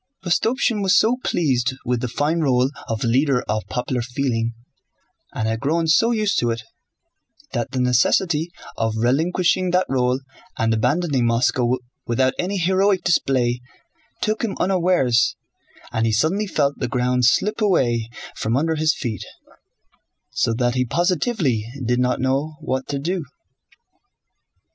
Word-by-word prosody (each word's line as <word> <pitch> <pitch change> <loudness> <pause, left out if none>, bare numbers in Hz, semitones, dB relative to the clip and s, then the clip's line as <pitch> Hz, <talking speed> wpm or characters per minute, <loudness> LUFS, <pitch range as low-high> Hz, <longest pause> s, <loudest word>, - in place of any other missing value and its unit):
Rostopchín 225 +4 +1
was 195 0 +4
so 235 +3 +3
pleased 130 -5 0
with 125 -1 0
the 125 - -1
fine 145 +7 0
role 130 -3 +2 0.2
of 115 -1 -2
leader 125 +2 +2
of 105 0 -1
popular 125 0 -2
feeling, 120 -2 -2 0.8
and 110 - -1
had 110 0 -1
grown 160 +6 0
so 225 +9 +4
used 215 -3 +1
to 120 - 0
it, 115 -1 -3 0.9
that 120 0 -2
the 130 0 -3
necessity 150 +7 +2 0.3
of 110 -1 -1
relinquishing 170 +9 +1
that 180 +1 +2
role 125 -1 +1 0.4
and 115 0 +1
abandoning 130 +2 +1
Moscow 120 +1 +2 0.3
without 130 +2 +2
any 195 +3 -1
heroic 190 +2 +2
display 125 -7 +1 0.6
took 215 0 0
him 215 -4 -2
unawares 175 -10 +2 0.6
and 110 0 0
he - - +1
suddenly 165 - +1
felt 145 -5 0
the 125 - -1
ground 125 0 0
slip 210 - +2
away 120 - +1 0.3
from 115 +3 -1
under 160 +3 +1
his 155 0 +1
feet, 110 -7 -4 1.1
so - - 0
that 120 +1 0
he 125 0 +1
positively 170 - 0 0.2
did 120 +1 +1
not 125 0 +1
know 135 +4 -1
what 130 -4 -3
to 140 - -2
do. 170 +5 -2
135 Hz, 145 wpm, -21 LUFS, 120-175 Hz, 1.1 s, was